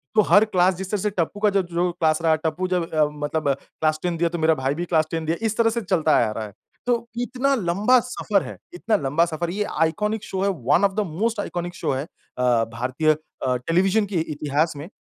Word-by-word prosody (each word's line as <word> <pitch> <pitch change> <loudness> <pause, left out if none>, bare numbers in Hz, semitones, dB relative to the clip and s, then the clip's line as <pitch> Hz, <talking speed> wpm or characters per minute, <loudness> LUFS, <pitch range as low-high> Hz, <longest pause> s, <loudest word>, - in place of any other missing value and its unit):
तो 215 - +7
हर 205 +2 +7
क्लास 185 -2 +3
जिस 190 +1 -6
तरह 205 -3 0
से 210 - +1
टप्पू 190 +1 -2
का 210 -1 +3
जो 200 -1 +2
जो 175 +1 -1
क्लास 160 -2 +1
रहा 160 -1 +3
टप्पू 180 +4 -1
जब 180 -2 -1
अ, 155 -1 +4 0.2
मतलब 150 -1 -1
क्लास 155 0 -2
टेन 175 -2 -1
दिया 170 0 +1
तो 170 - -4
मेरा 160 0 +4
भाई 135 +1 -1
भी 175 +2 -3
क्लास 160 -3 +2
टेन 165 -1 -2
दिया 165 +2 0
इस 220 0 -1
तरह 230 -1 +4
से 235 +1 -2
चलता 175 -5 +1 0.2
आ - - -4
रहा 110 0 -4
है। 100 - -11 0.3
तो 235 -1 0
इतना 255 +3 0
लम्बा 210 +5 +3
सफ़र 215 -5 -1
है, - - -8 0.2
इतना 215 +5 0
लम्बा 150 +4 +1
सफ़र 170 +1 -3
है 180 - -4
ये 210 - 0 0.2
आइकॉनिक 210 +6 0
शो 190 0 -4
है, 200 - +2
one 170 +2 +1
of 195 -1 +3
the - - 0
most 210 +7 -1
iconic 175 -2 -4
show 195 - -2
है 135 +2 -2
अ, - - -12 0.7
भारतीय 130 +6 -1
अ, 140 -4 -3
टेलीविजन 190 - +2
के 200 -2 -7
इ - - +1
इतिहास 150 +2 0
में 150 +4 -7
175 Hz, 245 wpm, -23 LUFS, 155-205 Hz, 0.7 s, तो